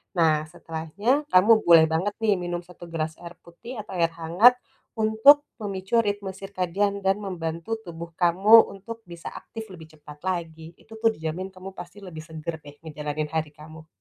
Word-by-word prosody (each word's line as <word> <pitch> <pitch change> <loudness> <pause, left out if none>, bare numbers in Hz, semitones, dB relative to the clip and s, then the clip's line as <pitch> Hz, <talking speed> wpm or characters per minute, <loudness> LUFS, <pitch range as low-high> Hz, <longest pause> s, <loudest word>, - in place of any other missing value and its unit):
Nah, 155 -3 +2
setelahnya, 175 - -2
kamu 185 +5 +6 0.2
boleh 165 -2 +8
banget, 185 +6 0
nih, 210 -2 +4
minum 175 0 -4
1 175 0 -13
gelas 160 -1 -4
air 175 0 -10
putih, 225 +9 -11
atau 210 - -13
air 165 0 +2
hangat, 175 +10 +5 0.4
untuk 225 +7 +5 0.2
memicu 200 +2 0
ritme 205 -2 -3
sirkadian 195 +1 -2
dan 195 +2 +2
membantu 170 +2 -4
tubuh 170 -1 -8
kamu, 195 +6 +6
untuk 225 +4 -9
bisa 170 -1 -8
aktif 225 -1 -9
lebih 160 -3 -11
cepat 150 -1 -13
lagi. 165 -3 -4
Itu, 220 0 -13
tuh, 225 0 +3
dijamin, 170 +4 -5
kamu 185 +1 -9
pasti 190 +4 -10
lebih 165 -5 -9
segar 160 0 -6
deh, 145 0 -12
ngejalanin 150 -1 -4
hari 160 -2 -2
kamu. 160 +1 -13
175 Hz, 165 wpm, -25 LUFS, 160-205 Hz, 0.4 s, boleh